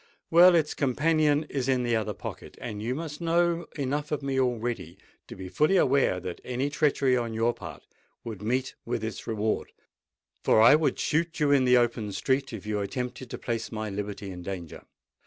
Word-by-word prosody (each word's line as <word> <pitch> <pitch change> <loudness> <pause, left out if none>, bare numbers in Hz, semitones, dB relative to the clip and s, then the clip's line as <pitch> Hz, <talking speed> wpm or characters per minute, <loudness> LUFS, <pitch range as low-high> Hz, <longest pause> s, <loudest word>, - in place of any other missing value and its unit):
Well 175 +2 +8
its 155 -3 +2
companion 150 +2 +2
is 135 -4 -3
in 130 -2 +2
the 120 -1 +1
other 110 -2 -2
pocket; - - -8
and 105 -3 -6
you 120 +4 -2
must 155 0 -6
know 170 0 +1
enough 145 +2 -2
of 150 -2 -2
me 135 -1 0
already, 120 -8 -2 0.3
to - - -9
be 95 0 -7
fully 155 - +2
aware 135 - +3
that 90 -1 -7
any 130 +3 -2
treachery 145 -4 +2
on 115 -2 -2
your 115 +2 +2
part - - -10 0.4
would 110 -4 -7
meet 125 +4 -1
with 115 -1 -3
its 110 -2 -5
reward; 110 -1 -1 0.7
for - - +4
I 115 +5 +8
would 155 0 +2
shoot 165 +2 -1
you 150 -2 +3
in 135 -2 +4
the 125 0 +6
open 120 -3 0
street, 135 +7 0
if 110 -4 -7
you 105 -1 -1
attempted 125 +5 -4
to - - -5
place 115 -1 -3
my 110 -2 -4
liberty 100 0 -5
in 90 -1 -8
danger." 90 -3 -7
125 Hz, 195 wpm, -27 LUFS, 110-150 Hz, 0.7 s, Well